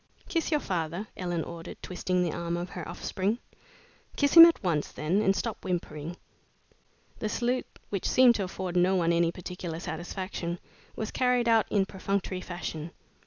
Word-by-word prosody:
"Kiss 330 -3 0
your 305 -2 +2
father," 175 - -2
Ellen 175 -3 -2
ordered, 170 0 -8
twisting 180 0 0
the 170 - 0
arm 170 0 -2
of 175 +1 -5
her 175 -3 -6
offspring. 195 +4 -1 0.8
"Kiss 285 -1 +2
him 330 -1 +13
at 335 - 0
once, 160 -5 0
then, 175 +7 0
and 195 -2 +3
stop 220 +3 -3
whimpering." 170 -2 -3 1.0
The 215 - -2
salute, 245 +3 0 0.2
which 195 -3 -1
seemed 255 -2 +7
to 205 -4 -1
afford 185 -1 -5
no 180 +2 +4
one 170 -2 +2
any 170 0 +3
particular 175 -2 -6
satisfaction, 175 +1 -4 0.4
was 220 - -4
carried 250 -2 +2
out 225 -2 +4
in 200 -2 +3
perfunctory 190 -1 -2
fashion. 170 -3 -5
185 Hz, 165 wpm, -29 LUFS, 170-210 Hz, 1.0 s, him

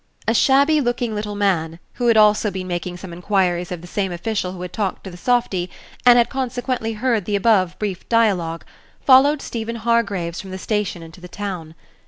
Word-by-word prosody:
A 230 - +3
shabby 280 +5 +4
looking 240 -2 -1
little 210 0 -4
man, 170 -5 0 0.2
who 245 - -1
had 230 -2 +5
also 210 0 +4
been 190 -1 -5
making 175 0 -4
some 180 -1 -9
inquiries 180 0 0
of 175 -2 -5
the - - -11
same 195 +1 -2
official 185 +1 -3
who 180 - -9
had 180 - -7
talked 205 -4 -2
to 190 - -8
the - - -10
softy, 190 -3 0 0.4
and 245 0 +8
had 235 - +4
consequently 250 -2 -3
Page 215 - -12
183 - - +1
heard 225 -7 +1
the 205 - -1
above 195 -4 +2
brief 200 -4 -4
dialogue, 185 -8 +1 0.4
followed 275 +2 +5
Stephen 230 0 -4
Hargraves 220 -7 -1
from 195 - -11
the 190 - -5
station 200 -3 -2
into 165 +2 -13
the 180 - -9
town. 180 -4 -6
205 Hz, 205 wpm, -21 LUFS, 180-235 Hz, 0.4 s, and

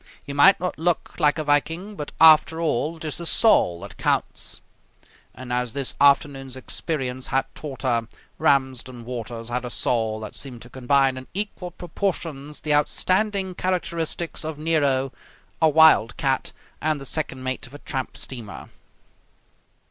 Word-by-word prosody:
He 140 - -5
might 165 +8 +6
not 180 -2 -3
look 175 0 -1
like 150 +2 +3
a 155 - -1
Viking, 160 +7 0
but 150 -5 -6
after 160 0 +7
all 160 0 0
it 160 - -9
is 155 - -4
the 170 - -6
soul 90 - +3
that 100 -1 -10
counts - - -1 0.8
and, 125 -1 -6
as 125 -1 -1
this 140 -2 0
afternoon's 140 -2 +3
experience 130 -2 -3
had 135 +1 +1
taught 140 -3 -8
her, 120 -3 +1 0.3
Ramsden 130 -3 0
Waters 115 -1 -6
had 125 +1 -2
a 125 - -4
soul 110 -1 0
that 110 - -7
seemed 125 -4 -7
to 120 - -14
combine 135 +1 +2
in 130 - -9
equal 200 -3 -3
proportions 165 -5 -4
the 150 - 0
outstanding 190 +6 +1
characteristics 170 -3 -2
of 155 -1 -4
Nero, 145 -4 +1 0.5
a 160 - +6
wildcat, 140 -4 +4 0.3
and 155 -1 0
the 135 - -8
second 135 -2 -4
mate 130 +1 -3
of 125 - -18
a - - -7
tramp 135 -3 -5
steamer. 110 - -6
140 Hz, 155 wpm, -24 LUFS, 130-160 Hz, 0.8 s, after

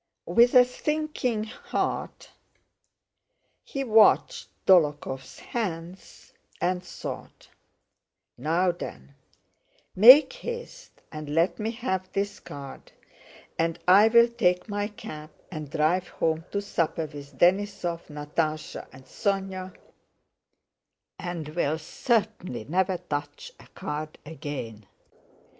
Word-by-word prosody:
With 240 +2 +4
a 250 0 +9
sinking 255 -4 -2
heart 220 - -4 1.3
he 275 - -4
watched 225 -3 +4 0.2
Dólokhov's 145 -7 +2
hands 180 -5 -6 0.3
and 180 0 0
thought, - - -8 0.9
"Now 165 +7 +1
then, 70 - -9 0.8
make 255 - +9
haste 485 0 -8
and 155 -1 -7
let 165 +8 +1
me 215 +1 -1
have 205 -6 -3
this 200 +1 -2
card 140 -1 -10 0.7
and 165 0 +1
I'll 220 +5 +7
take 185 -7 +1
my 205 -1 -2
cap 155 -7 -9 0.2
and 155 -4 -6
drive 170 +5 +1
home 160 0 -1
to 200 0 -2
supper 165 -4 -1
with 145 -2 -11
Denísov, 180 -1 +1
Natásha, 155 +1 -3
and 130 0 -15
Sónya, 190 +1 -2 1.5
and 170 -4 -5
will 155 -1 0
certainly 200 - -1
never 185 - 0
touch 180 - -5
a - - -16
card 155 +1 -6
again." 135 -9 -7
180 Hz, 100 wpm, -26 LUFS, 155-215 Hz, 1.5 s, a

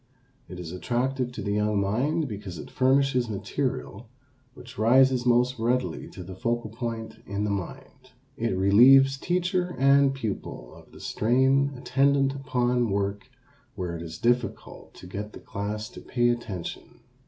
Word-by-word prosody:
It 90 - -8
is 85 -2 -6
attractive 125 +6 -1
to - - -6
the 100 - -2
young 105 0 +1
mind 130 +11 0
because 100 -6 -7
it - - -9
furnishes 130 -2 +2
material 110 0 -4 0.5
which 120 -3 -12
rises 125 +2 +4
most 125 +1 +3
readily 125 +3 -1
to 90 - -9
the 95 +2 -9
focal 115 +3 -2
point 115 -1 -5
in 100 +1 -2
the 105 - -1
mind. 130 +6 -7 0.3
It 115 -4 -1
relieves 130 +8 +6
teacher 180 +1 -1
and 140 0 +5
pupil 105 - -5
of - - -16
the - - -14
strain 135 +5 +2
attendant 135 +2 +2
upon 125 -3 0
work 100 +5 -2 0.5
where 90 -4 -4
it 85 - -6
is 80 -1 -7
difficult 120 +4 -2
to - - -12
get 105 +4 -6
the - - -9
class 105 +2 -5
to - - -11
"pay 120 -1 +1
attention." 110 -8 -5
120 Hz, 155 wpm, -26 LUFS, 100-130 Hz, 0.5 s, relieves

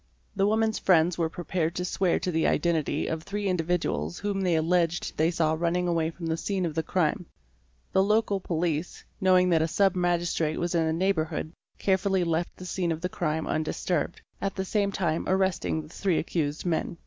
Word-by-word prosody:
'The 195 0 +2
woman's 220 0 +1
friends 175 -2 +4
were 165 -2 0
prepared 170 -1 -2
to 180 - -2
swear 180 0 +1
to 180 - -2
the 160 -1 +2
identity 160 -4 +1
of 160 0 -2
three 205 +4 -3
individuals 165 - -1
whom 200 -1 -2
they 180 -3 +2
alleged 170 +1 +1
they 160 +2 +2
saw 165 -2 +1
running 175 +2 0
away 165 -2 +1
from 170 +1 -8
the 160 0 0
scene 190 +2 -2
of 165 - -2
the 160 - 0
crime. 175 +1 0 0.7
The 190 - +5
local 210 0 +2
police 170 -2 -2 0.2
knowing 185 -1 +4
that 165 -2 +4
a 160 - +2
Sub 195 +3 +2
Magistrate 175 -3 0
was 175 0 -1
in 165 -2 +2
the - - +1
neighbourhood 165 -2 -1 0.2
carefully 190 -1 +1
left 170 0 -1
the 185 - -9
scene 180 -2 -1
of 160 0 -3
the 180 - -1
crime 160 -3 -1
undisturbed, 160 +2 -1 0.2
at 195 0 -2
the 190 - -2
same 200 0 0
time 170 -4 -1
arresting 190 -4 +1
the 150 - -13
three 185 0 0
accused 150 -2 -2
men. 170 0 -1
175 Hz, 195 wpm, -27 LUFS, 160-190 Hz, 0.7 s, The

